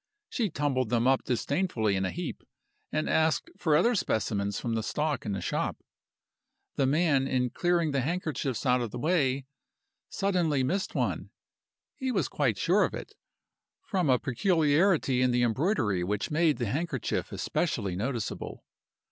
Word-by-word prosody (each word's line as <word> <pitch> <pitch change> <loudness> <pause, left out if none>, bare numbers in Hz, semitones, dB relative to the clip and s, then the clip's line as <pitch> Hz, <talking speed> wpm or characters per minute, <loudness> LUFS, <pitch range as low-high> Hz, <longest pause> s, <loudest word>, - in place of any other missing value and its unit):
She 235 - 0
tumbled 140 -6 0
them 120 0 +2
up 135 0 +3
disdainfully 125 - 0
in 95 0 0
a - - 0
heap, - - -5 0.5
and 155 0 -1
asked 160 0 +1
for 160 -4 +2
other 210 +11 +4
specimens 100 - -1
from 115 - -2
the 110 - 0
stock 150 +2 -2
in 100 - -1
the 95 - -3
shop. - - -1 1.0
The 135 - +2
man, 140 -2 +2
in 125 -2 0
clearing 175 -3 +1
the 140 -1 +1
handkerchiefs 145 -5 -2
out 125 -1 +3
of 120 - -2
the 120 - -7
way, 140 -3 +1 0.6
suddenly 175 -8 +1
missed 190 +9 -1
one. - - -1 0.7
He 260 -2 -2
was 190 - 0
quite 130 -9 0
sure 185 - +3
of - - -1
it, - - -8 0.7
from 185 - 0
a 130 - +5
peculiarity 150 - +2
in 125 - +3
the 120 0 +2
embroidery 120 - +1
which 100 +7 -2
made 155 -1 +3
the 120 - -1
handkerchief 140 +3 -2
especially 95 -3 -1
noticeable. 115 +3 -4
135 Hz, 155 wpm, -29 LUFS, 120-165 Hz, 1.0 s, a